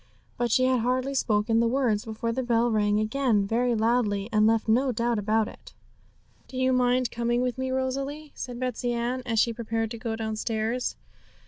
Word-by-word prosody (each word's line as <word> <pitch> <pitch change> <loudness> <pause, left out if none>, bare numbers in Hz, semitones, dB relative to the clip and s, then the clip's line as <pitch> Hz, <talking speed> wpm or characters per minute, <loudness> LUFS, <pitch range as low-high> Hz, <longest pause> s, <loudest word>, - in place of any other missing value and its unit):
But 240 0 -1
she 255 +3 +3
had 255 -1 +3
hardly 255 +3 0
spoken 225 -3 +1
the 235 - +3
words 235 -4 +1
before 225 +1 -3
the 260 - -1
bell 240 -1 +1
rang 210 -1 +2
again 220 -2 +1
very 235 +3 +1
loudly, 220 -2 +1
and 215 0 +4
left 225 0 +2
no 255 +4 +3
doubt 235 -1 0
about 215 +1 +1
it. - - -13 0.7
'Do 255 - -8
you 260 0 +2
mind 250 0 +2
coming 240 +1 0
with 250 0 -2
me, 260 0 -1
Rosalie?' 275 +3 -3
said 245 -1 -6
Betsey 250 -1 -2
Ann, 240 +2 -2
as 225 -2 -1
she 230 +1 +3
prepared 225 -1 -2
to 230 - -6
go 225 -1 -3
downstairs. 220 +2 -2
235 Hz, 190 wpm, -26 LUFS, 220-255 Hz, 0.7 s, and